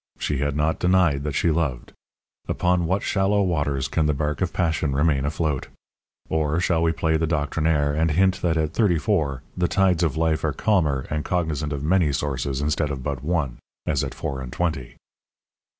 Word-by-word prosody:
She 75 -3 -2
had 70 0 -1
not 75 +2 0
denied 90 -6 +3
that 75 -2 -2
she 85 - +2
loved. 75 -6 -2 0.5
Upon 90 -1 +1
what 95 +4 0
shallow 100 +1 +2
waters 75 -7 0
can 80 +2 +1
the 75 - +1
bark 75 +2 -2
of 95 - 0
passion 80 -5 0
remain 70 -2 +2
afloat! 75 -2 -1 0.6
Or, 80 0 0
shall 85 -2 +1
we 85 0 +3
play 80 -1 +1
the 80 +1 0
doctrinaire, 75 -1 +1
and 80 +2 +1
hint 95 +4 +2
that 85 -2 +1
at 80 0 -1
thirty 95 -5 +3
four 75 - 0
the 90 -1 +1
tides 95 -3 +2
of 80 -4 0
life 80 -1 +1
are 75 -2 0
calmer 75 -8 +1
and 75 0 -1
cognizant 80 -4 -1
of 70 -1 -3
many 85 -1 +3
sources 70 -1 -2
instead 75 +1 0
of 70 -3 -5
but 70 -2 -3
one 75 -6 -1 0.3
as - - 0
at - - -5
four 65 -1 -4
and 65 -1 -7
twenty? 80 -4 -2
80 Hz, 190 wpm, -24 LUFS, 70-85 Hz, 0.6 s, denied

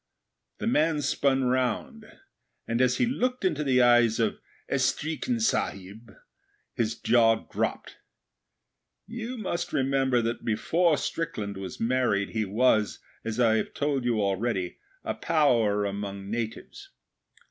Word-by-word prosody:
The - - -5
man 155 -8 +2
spun 135 -1 +1
round, 125 -1 -1 0.6
and, 115 +2 0
as 125 0 +3
he - - +3
looked 250 -2 -1
into 150 -5 +1
the 130 -3 +3
eyes 120 -2 +4
of 110 -2 0 0.3
'Estreekin 155 - -1
Sahib', 110 - -2 0.6
his 115 -1 -2
jaw 115 -2 +3
dropped. - - -3 1.1
You 235 +3 -6
must 175 -5 -3
remember 135 -1 +1
that 115 +1 -3
before 160 +9 +2
Strickland 110 -12 -3
was 95 -1 -7
married, 115 -4 +1
he 110 -1 -1
was, 110 0 +2 0.3
as 115 +1 -4
I 115 -2 +4
have - - -3
told 140 -3 0
you 120 -3 +1
already, 100 -2 -1 0.2
a - - -2
power 120 -11 +2
among 100 0 -5
natives. 115 -1 -5
120 Hz, 125 wpm, -27 LUFS, 110-150 Hz, 1.1 s, eyes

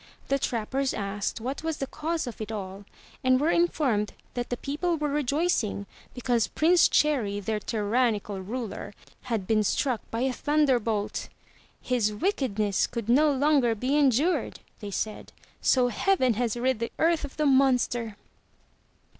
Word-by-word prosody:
The 275 - +2
trappers 260 +2 -1
asked 200 +2 -3
what 260 +4 -4
was 320 -1 -2
the 270 - -2
cause 320 +3 -3
of 240 -3 -7
it 215 0 -4
all 200 -1 -6 0.4
and 255 0 +4
were 310 +4 +2
informed 270 -11 +1 0.2
that 245 -1 -3
the 245 - -2
people 325 +6 -1
were 300 -1 -1
rejoicing 280 - 0 0.3
because 245 -2 +1
Prince 340 +3 +4
Cherry, 240 -10 +1
their 210 +1 -2
tyrannical 210 -2 0
ruler, 210 0 -5 0.3
had 225 -6 -2
been 215 +1 +2
struck 245 +3 0
by 230 - -3
a 260 0 +1
thunderbolt. 245 -9 0 0.5
"His 240 -4 +1
wickedness 215 - 0
could 230 -2 -5
no 295 +5 +5
longer 275 -4 +3
be 255 +6 -1
endured, 290 +4 +2 0.2
they 205 - -6
said, 215 +2 -4 0.3
"so 250 -2 +3
heaven 260 - +2
has 235 +1 -1
rid 255 -1 0
the 230 - -3
earth 325 0 +2
of 285 0 -7
the 305 - +1
monster.' 250 -5 +2
250 Hz, 150 wpm, -27 LUFS, 215-290 Hz, 0.5 s, no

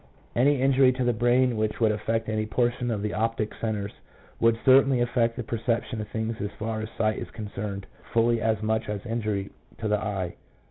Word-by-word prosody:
2 - - -2
Any 140 +2 +4
injury 135 0 +5
to 130 0 -1
the 120 0 +2
brain 120 +2 +3
which 110 0 -1
would 110 -2 +4
affect 115 +1 -1
any 110 0 -1
portion 120 +2 0
of 105 -3 -2
the 105 - -2
optical 110 0 -1
centres 105 -3 -2 0.5
would 115 0 +4
certainly 135 0 +6
affect 120 -1 +1
the 125 - -4
perception 115 0 -2
of 105 - -6
things 110 +1 -3
as 105 - -2
far 110 0 -3
as 110 - -5
sight 110 -1 +1
is - - -6
concerned 100 -2 -5 0.3
fully 115 0 +3
as 110 -1 0
much 110 0 0
as 105 0 -4
injury 105 -4 -2 0.3
to 110 - -3
the 105 0 +2
eye. 95 -5 -3
110 Hz, 200 wpm, -26 LUFS, 105-120 Hz, 0.5 s, certainly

